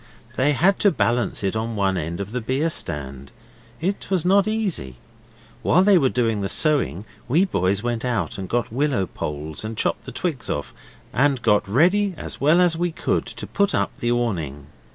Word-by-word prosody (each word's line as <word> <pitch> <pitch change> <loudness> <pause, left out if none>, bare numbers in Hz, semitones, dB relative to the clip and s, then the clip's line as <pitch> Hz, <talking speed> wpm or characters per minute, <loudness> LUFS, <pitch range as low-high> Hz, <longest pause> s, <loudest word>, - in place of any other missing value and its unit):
They 140 +3 +2
had 190 +8 +3
to 205 - +5
balance 120 - 0
it 100 +2 -1
on 110 +1 -2
one 100 -2 +1
end 85 0 -3
of 100 +1 -5
the 125 +1 -3
beer 135 +8 0
stand. 70 - -3 0.5
It 190 +5 -3
was 185 -3 +1
not 195 +2 +4
easy. 200 - -2 0.6
While 180 +4 +4
they 195 -2 +5
were 135 -4 +3
doing 115 -5 0
the 95 - -2
sewing 130 - +2 0.2
we 160 +10 +3
boys 100 - 0
went 120 -1 -2
out 120 -6 -2
and 95 - -6
got 120 -2 -1
willow 135 -7 +1
poles 75 0 -5
and 110 0 -5
chopped - - -1
the 135 - -7
twigs 135 0 -3
off, 75 - -3 0.4
and 140 0 +2
got 105 -3 +3
ready 185 - +3
as - - -7
well 155 +5 +5
as 175 -2 +3
we 175 +1 -1
could 175 +2 -1
to - - -6
put 200 -1 0
up - - 0
the 120 - 0
awning. 85 - -2
120 Hz, 195 wpm, -22 LUFS, -, 0.6 s, to